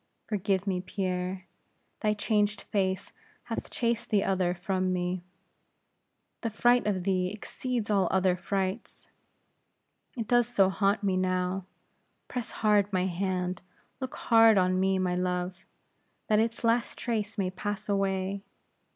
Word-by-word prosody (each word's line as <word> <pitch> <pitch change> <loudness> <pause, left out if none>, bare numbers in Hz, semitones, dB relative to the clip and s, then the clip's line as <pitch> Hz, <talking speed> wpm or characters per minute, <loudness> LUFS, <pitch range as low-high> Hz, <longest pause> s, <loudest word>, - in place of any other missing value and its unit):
Forgive 200 -2 0
me, 185 -3 0
Pierre; 185 -1 -3 0.5
thy 210 -1 +1
changed 210 -1 +1
face 190 -1 -1 0.3
hath - - -4
chased 235 -1 -1
the 205 -3 +3
other 185 -2 +1
from 185 +1 -1
me; 180 0 -1 1.2
the 230 - -1
fright 240 +2 +3
of 190 -3 0
thee 185 -1 +1
exceeds 225 +1 -3
all 195 -3 +3
other 185 -1 +3
frights. 190 +3 -3 1.1
It 225 -3 -3
does 240 -1 +4
not 245 - -12
so 195 -1 +5
haunt 200 +2 +1
me 190 -2 +2
now. 185 0 0 0.6
Press 245 -2 -4
hard 205 -2 +2
my 185 -1 +1
hand; 185 0 -1 0.4
look 260 -2 -5
hard 225 -2 +6
on 185 0 +3
me, 190 0 +2
my 180 -1 0
love, 180 +1 -2 0.6
that 215 -1 +4
its 230 +1 0
last 230 +1 +1
trace 220 -3 -2
may 185 -2 0
pass 205 +2 -4
away. 195 -1 0
195 Hz, 140 wpm, -29 LUFS, 185-215 Hz, 1.2 s, hard